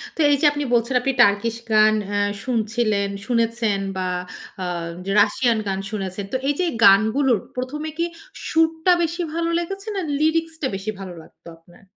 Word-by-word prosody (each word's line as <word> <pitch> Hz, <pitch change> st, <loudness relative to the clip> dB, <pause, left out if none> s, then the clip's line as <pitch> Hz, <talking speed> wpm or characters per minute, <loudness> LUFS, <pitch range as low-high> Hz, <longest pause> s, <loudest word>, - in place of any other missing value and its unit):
তো -, -, -19 dB
এইযে 285 Hz, +2 st, +2 dB
আপনি 290 Hz, 0 st, -3 dB
বলছেন 235 Hz, +2 st, +1 dB
আপনি 270 Hz, -, 0 dB
টার্কিশ 205 Hz, +2 st, +3 dB, 0.2 s
গান 215 Hz, 0 st, +5 dB, 0.2 s
অ্যা 205 Hz, 0 st, 0 dB, 0.2 s
শুনছিলেন, 220 Hz, -4 st, 0 dB, 0.2 s
শুনেছেন 230 Hz, -3 st, 0 dB, 0.2 s
বা 185 Hz, -1 st, -1 dB, 0.6 s
আ -, -, -2 dB, 0.4 s
য -, -, -10 dB
রাশিয়ান 235 Hz, 0 st, +2 dB
গান 190 Hz, 0 st, -1 dB
শুনেছেন। 195 Hz, -1 st, -4 dB
তো -, -, +1 dB
এইযে 290 Hz, +6 st, 0 dB, 0.2 s
গানগুলোর 220 Hz, +4 st, +4 dB, 0.2 s
১ম 255 Hz, +4 st, -4 dB
এ -, -, -8 dB
কি 335 Hz, -, +1 dB, 0.4 s
সুরটা 320 Hz, +2 st, +2 dB
বেশি 340 Hz, +2 st, -2 dB
ভালো 335 Hz, 0 st, -1 dB
লেগেছে 390 Hz, +4 st, -6 dB
না -, -, -1 dB, 0.2 s
লিরিক্স 320 Hz, +1 st, +1 dB
টা 265 Hz, -, +1 dB
বেশি 195 Hz, +3 st, -4 dB
ভালো 190 Hz, -2 st, -7 dB
লাগতো -, -, -19 dB
আপনার? 175 Hz, +3 st, -21 dB
235 Hz, 165 wpm, -22 LUFS, 205-310 Hz, 0.6 s, গান